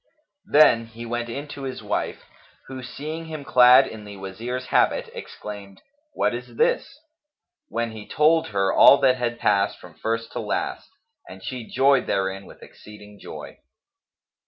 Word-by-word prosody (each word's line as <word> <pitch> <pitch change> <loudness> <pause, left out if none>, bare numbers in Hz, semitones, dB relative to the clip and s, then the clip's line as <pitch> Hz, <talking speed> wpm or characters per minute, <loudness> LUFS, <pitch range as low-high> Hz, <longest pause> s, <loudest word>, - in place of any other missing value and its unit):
Then 115 -7 +5
he 115 +1 -10
went 120 0 -3
in 140 +5 -5
to 140 - -8
his 130 -1 -6
wife, - - -3 0.4
who 130 -1 -8
seeing 155 +6 -6
him 155 -2 -7
clad 125 +1 +7
in 110 -1 -9
the 100 -1 -10
Wazir's 115 +7 -5
habit, - - +2
exclaimed, 100 -2 -9 0.3
"What 125 0 +1
is 120 0 -7
this?"; 275 - 0 0.7
when 115 - -2
he 110 -1 -10
told 160 +2 +3
her 100 -2 0
all 140 - +8
that 130 -1 +4
had 120 -1 -2
passed 100 -1 +1
from 90 - -14
first 115 +6 -3
to - - -5
last - - -3 0.4
and 95 0 -12
she 125 -3 -6
joyed 135 -1 +3
therein 95 0 -2
with - - -15
exceeding 105 -1 -14
joy. - - -10
120 Hz, 160 wpm, -23 LUFS, 105-130 Hz, 0.7 s, all